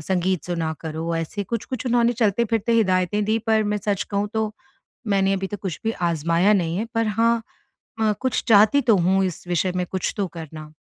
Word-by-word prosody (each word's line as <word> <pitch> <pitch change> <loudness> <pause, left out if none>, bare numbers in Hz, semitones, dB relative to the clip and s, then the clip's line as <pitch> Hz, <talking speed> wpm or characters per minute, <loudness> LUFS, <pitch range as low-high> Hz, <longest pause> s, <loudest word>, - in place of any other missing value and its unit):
"संगीत 180 +1 -1
सुना 165 -3 -2
करो।" 160 +1 -3
ऐसे 165 +5 -3
कुछ-कुछ 235 +4 -4
उन्होंने 240 0 +3
चलते 225 -1 +1
फिरते 225 0 +1
हिदायतें 205 -1 +2
दी 220 +2 +1
पर 220 -1 +3
मैं - - +1
सच 200 -1 +1
कहूँ 200 +1 -1
तो, 220 -1 -1 0.5
मैंने 195 -1 +2
अभी 195 0 -1
तक 205 +2 -6
कुछ 185 -5 -4
भी 225 - +1 0.2
आज़माया 170 +4 +2
नहीं 170 -4 +1
है, 210 - -1
पर 230 -1 +1
हाँ 230 +2 +2 0.6
अ, 215 -1 +3
कुछ 260 -1 0
चाहती 220 +6 +6
तो 230 -3 +4
हूँ 190 +2 +2
इस 180 -2 -5
विषय 180 +1 0
में 180 0 0
कुछ 190 - -2
तो 200 - 0
करना। 155 -1 -9
200 Hz, 200 wpm, -23 LUFS, 175-220 Hz, 0.6 s, चाहती